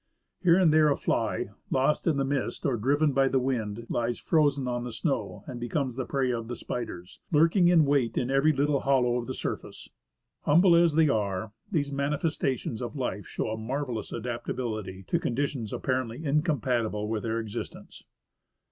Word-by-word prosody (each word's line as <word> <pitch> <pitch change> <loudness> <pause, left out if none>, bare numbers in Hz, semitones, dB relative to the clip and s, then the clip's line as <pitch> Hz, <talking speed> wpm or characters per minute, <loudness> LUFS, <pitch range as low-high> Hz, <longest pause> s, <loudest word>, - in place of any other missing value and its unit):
Here 175 -2 +5
and 175 -5 +4
there 155 -1 +5
a 140 - +3
fly, - - -1 0.2
lost 135 +6 +1
in 155 -4 +3
the 135 - +1
mist 135 -1 -2
or 135 - +2
driven 145 +7 +2
by 135 0 +3
the 135 - +1
wind, 115 -4 -2
lies 120 +1 -1
frozen 145 -5 +2
on 120 -1 -2
the 120 - -5
snow, 110 - -2
and 125 -2 -7
becomes 125 +1 -2
the 130 -2 -3
prey 135 -2 0
of 115 -2 -3
the 120 - -4
spiders, 95 -9 -6
lurking 165 +4 +4
in 170 -3 +5
wait 140 -5 +1
in 125 +1 0
every 135 +3 +4
little 145 0 +1
hollow 125 -3 +2
of 120 - -4
the 130 - -4
surface. - - -5 0.5
Humble 170 +4 +5
as 170 -2 +4
they 160 -1 +5
are, 105 -4 -1 0.2
these 145 -6 0
manifestations 140 -4 -1
of 120 +3 -5
life 115 -7 -3
show - - -3
a 110 - -3
marvellous 120 -1 -3
adaptability 115 -4 -4
to 170 - 0
conditions 130 -5 -2
apparently 130 +2 -2
in 150 +1 +3
compatible 120 - -1
with 110 -1 -2
their 115 -1 -2
existence. 110 -2 -7
130 Hz, 180 wpm, -28 LUFS, 115-145 Hz, 0.5 s, Here